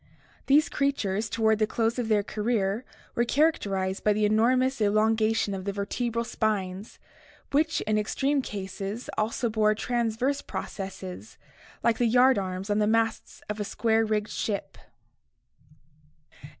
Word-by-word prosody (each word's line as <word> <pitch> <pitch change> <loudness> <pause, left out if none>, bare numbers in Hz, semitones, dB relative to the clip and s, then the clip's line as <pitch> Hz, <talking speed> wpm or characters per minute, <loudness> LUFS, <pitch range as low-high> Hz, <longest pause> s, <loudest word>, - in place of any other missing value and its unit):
These 295 +3 +5
creatures 225 -7 -1
toward 220 -1 +2
the 215 - +2
close 230 +2 0
of 240 - -1
their 210 -2 +2
career 210 0 -1 0.3
were 235 - +2
characterized 200 - +1
by 210 - +4
the 210 +1 +1
enormous 250 +4 +2
elongation 215 0 +2
of 190 -1 -4
the 200 - -2
vertebral 230 +4 -2
spines, 205 -3 -2 0.5
which 310 +3 +2
in 215 0 +1
extreme 275 +6 0
cases 200 +1 -5
also 220 +3 0
bore 215 -1 +2
transverse 240 +4 -1
processes 190 +1 -7 0.5
like 230 -1 +2
the 240 - +3
yard 250 0 +5
arms 190 +1 -4
on 205 - +2
the 210 - +2
masts 225 0 0
of 210 0 -4
a - - 0
square 225 +2 +1
rigged 215 -1 -1
ship 205 -3 -3
(see 150 - -31
Fig. 140 - -12
215 Hz, 145 wpm, -27 LUFS, 200-235 Hz, 0.5 s, These